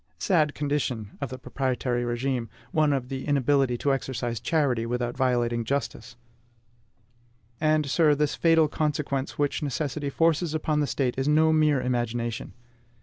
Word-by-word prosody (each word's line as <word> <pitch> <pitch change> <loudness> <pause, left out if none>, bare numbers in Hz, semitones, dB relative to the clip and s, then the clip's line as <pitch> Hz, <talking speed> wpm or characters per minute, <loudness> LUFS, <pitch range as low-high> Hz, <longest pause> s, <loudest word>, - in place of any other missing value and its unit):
Sad 155 -6 +1
condition 135 -8 -2
of 140 - -2
the 130 - -6
proprietary 125 -1 -2
regime, 120 0 -2 0.2
one 155 -2 +3
of 130 -2 -2
inability 135 -1 +1
to 140 +3 +1
exercise 120 -3 -3
charity 140 -8 +1
without 120 0 -2
violating 120 -3 +1
justice! 135 0 -3 1.4
And, 155 -1 +2
sir, 150 +1 +3
this 150 0 0
fatal 165 -2 +4
consequence 145 -3 -2
which 145 -1 0
necessity 145 0 -2
forces 165 +2 +1
upon 155 -1 0
the 145 - +1
State 130 -2 -1
is 135 - 0
no 160 +1 +4
mere 155 -3 +3
imagination. 120 -2 -2
140 Hz, 140 wpm, -26 LUFS, 125-150 Hz, 1.4 s, fatal